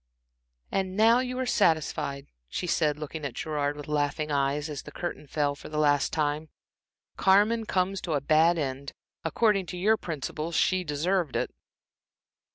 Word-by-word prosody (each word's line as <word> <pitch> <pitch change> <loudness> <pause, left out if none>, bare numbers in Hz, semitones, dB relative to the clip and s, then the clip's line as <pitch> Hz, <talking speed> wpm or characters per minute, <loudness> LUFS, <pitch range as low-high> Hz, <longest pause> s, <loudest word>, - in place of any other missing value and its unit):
"And 190 0 -1
now 225 +3 +6
you 255 0 -2
are 260 - -1
satisfied," 155 - +1 0.2
she - - -3
said, 155 -4 +1
looking 155 +1 -6
at 135 -4 -4
Gerard 145 -2 -2
with 145 - -8
laughing 150 0 -1
eyes, 140 +1 0
as 150 -3 -5
the 150 - -11
curtain 175 -3 -5
fell 145 0 0
for 140 - -11
the 155 - -4
last 145 -2 +3
time. 155 +1 -1 0.7
"Carmen 210 +4 +4
comes 190 +1 0
to 165 - -3
a - - +2
bad 155 +4 +4
end. 140 -2 -3 0.3
According 195 +2 +2
to 180 - -6
your 215 +5 +3
principles! 155 0 -4
she 185 -1 +2
deserved 165 +1 0
it." - - -1
155 Hz, 165 wpm, -28 LUFS, 145-185 Hz, 0.7 s, now